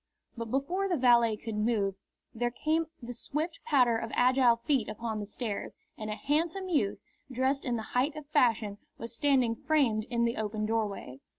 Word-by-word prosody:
But 230 -1 -5
before 345 - 0
the 350 - +1
valet 235 -4 +4
could 225 +1 -6
move 210 -2 +1 0.4
there 240 +1 0
came 315 +6 0 0.2
the 245 +1 -5
swift 310 +7 -3
patter 245 -5 +4
of 225 - -4
agile 250 -1 +5
feet 235 -1 0
upon 220 0 -3
the 205 - -5
stairs, 215 -1 -4 0.2
and 215 0 -6
a 210 - -2
handsome 325 - -1
youth, 255 - +1 0.3
dressed 260 +2 0
in 245 - +1
the 225 - -3
height 270 +5 +2
of 305 -1 -7
fashion, 230 -8 +2 0.2
was 230 +1 -7
standing 265 -5 +3
framed 230 -5 +1
in 235 -1 0
the 235 - -1
open 215 0 -2
doorway. 210 - -2
240 Hz, 180 wpm, -30 LUFS, 220-280 Hz, 0.4 s, agile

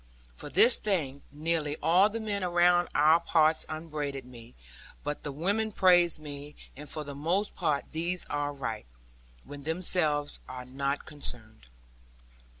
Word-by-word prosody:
For - - -7
this 240 +2 +5
thing, 150 -10 -1
nearly 150 0 -1
all 185 +5 +4
the 225 +2 -4
men 205 -3 -3
around 175 0 +3
our 155 +3 +6
parts 160 -2 +2
upbraided 150 -4 -5
me; 120 -1 -14 0.5
but 145 0 -3
the 145 - -5
women 200 +9 -1
praised 175 -4 +4
me: 145 -1 -9 0.2
and 145 +2 -9
for 155 - -2
the 145 -1 -7
most 175 +9 -1
part 155 -5 0
these 170 +2 -1
are 145 0 -2
right, 115 - -5 0.6
when 145 0 -10
themselves 155 -2 0
are 125 -1 -7
not 140 +2 -3
concerned. 115 - -7
155 Hz, 145 wpm, -29 LUFS, 140-175 Hz, 0.6 s, our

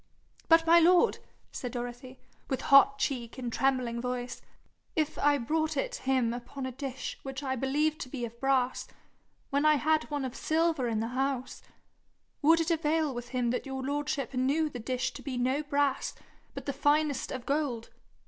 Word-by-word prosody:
'But, 330 0 +6
my 335 +1 +7
lord,' 355 +6 +4 0.3
said 250 -1 -5
Dorothy, 245 +1 -6 0.3
with 265 - -1
hot 275 0 +8
cheek 245 -5 -2
and 245 -3 -4
trembling 255 -3 0
voice, 250 0 -4 0.5
'if 310 -3 -1
I 290 0 +4
brought 310 +4 -1
it - - -1
him 250 -3 +2
upon 245 +3 -6
a 260 - -3
dish 265 0 -6
which 270 +1 -6
I 265 -1 -1
believed 295 +5 0
to 255 - -5
be 250 -3 -4
of 235 0 -11
brass, 260 -1 +1 0.6
when 280 +1 +2
I 305 0 +6
had 310 +2 +2
one 290 -2 -2
of 255 - -5
silver 320 -5 +1
in 220 -2 0
the 225 - -2
house, 260 0 -2 0.8
would 325 +3 +5
it 330 +1 0
avail 315 -2 +1
with 240 0 -6
him 245 -2 0
that 250 - -3
your 265 -1 -4
lordship 290 0 -2
knew 280 +5 +1
the 245 - -6
dish 250 +3 -2
to - - -9
be 265 -3 -4
no 260 +4 +1
brass, 285 -2 0 0.4
but - - -6
the 280 - -2
finest 290 0 +1
of 255 -2 -5
gold? 275 -6 -1
270 Hz, 180 wpm, -30 LUFS, 250-300 Hz, 0.8 s, hot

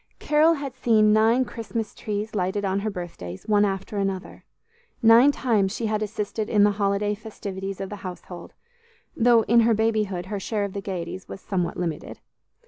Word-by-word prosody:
Carol 305 +2 +3
had 280 -3 -5
seen 220 -4 +3
nine 225 +4 +4
Christmas 225 -2 -5
trees 210 0 -4
lighted 200 +1 -1
on 195 +1 0
her 215 +2 -2
birthdays, 165 - -7
one 210 -1 +4
after 195 +1 -2
another; 195 -2 -4 0.6
nine 230 +5 +7
times 215 -8 0
she 230 - -3
had 215 -1 -1
assisted 215 0 -3
in 210 -2 +4
the 205 - +5
holiday 200 0 0
festivities 195 -3 -6
of 195 0 -5
the 205 - -5
household, 180 -2 -9 0.6
though 235 -1 +4
in 235 +2 +4
her 230 -1 +4
babyhood 210 -5 0
her 200 +1 -4
share 205 +1 -2
of 200 - -7
the 200 - -4
gayeties 185 -1 -5
was - - -7
somewhat 180 -3 -2
limited. 165 -4 -4
205 Hz, 175 wpm, -24 LUFS, 195-225 Hz, 0.6 s, nine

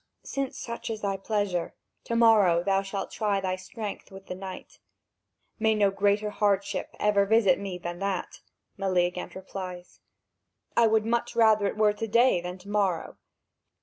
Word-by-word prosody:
Since 275 -1 -3
such 235 -1 -6
is 220 -1 -4
thy 200 -1 -1
pleasure, 195 -4 -2 0.3
to 230 - -2
morrow 210 -7 +5
thou 195 +1 +2
shalt 195 0 -5
try 205 -3 0
thy 185 -1 -1
strength 205 +3 -7
with 195 0 -11
the - - -5
knight." 185 0 -9 0.8
"May 220 0 +3
no 205 -2 +3
greater 205 +1 +1
hardship 200 -1 0
ever 205 -1 +3
visit 215 -4 +4
me 195 -3 -5
than 175 0 -6
that!" 195 -1 -3 0.4
Meleagant 180 -2 0
replies; 185 -1 -8 0.8
"I 235 - +5
would 220 0 +2
much 235 +1 -1
rather 220 -3 +4
it 200 - -4
were 210 -1 +4
to 225 +2 -4
day 235 -4 +4
than 180 +1 -6
to 190 +2 -14
morrow. 200 -5 0
200 Hz, 160 wpm, -27 LUFS, 185-215 Hz, 0.8 s, morrow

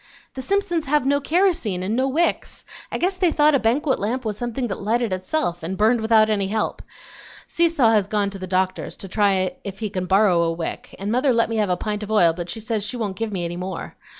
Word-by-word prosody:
"The 260 - -5
Simpsons 350 -1 0
have 295 -1 +2
no 285 +1 +2
kerosene 330 - +1
and 205 +4 -1
no 260 +2 +1
wicks. 320 +6 -1 0.3
I - - -1
guess 370 +2 0
they 365 -3 +2
thought 300 0 +4
a 275 - +4
banquet 260 +5 +1
lamp 240 +5 -2
was 215 -2 -2
something 240 +3 -3
that 195 - -4
lighted 225 0 0
itself, 185 - -2
and 180 +4 -4
burned 225 +2 +3
without 220 -1 +4
any 205 -3 0
help. 215 +2 -2 0.6
Seesaw 330 -9 +2
has 210 -3 +2
gone 205 -1 0
to 195 - -7
the 185 - -6
doctor's 185 0 -1
to 195 - -9
try 195 0 +1
if 195 -1 -6
he 215 -2 -4
can 185 -3 -3
borrow 190 -3 +4
a 165 0 +1
wick, 165 0 -6
and 200 +2 -3
mother 255 +3 +2
let 230 -1 +2
me 225 - -1
have 210 -3 +1
a 180 - +1
pint 210 +2 -3
of 210 - -6
oil, 175 -7 +4
but 175 +1 -6
she 225 - -3
says 220 -1 -2
she 245 +4 -3
won't 205 -5 -3
give 225 0 -3
me 180 -3 -2
any 170 +1 -4
more. 180 -1 -6
215 Hz, 240 wpm, -22 LUFS, 190-260 Hz, 0.6 s, thought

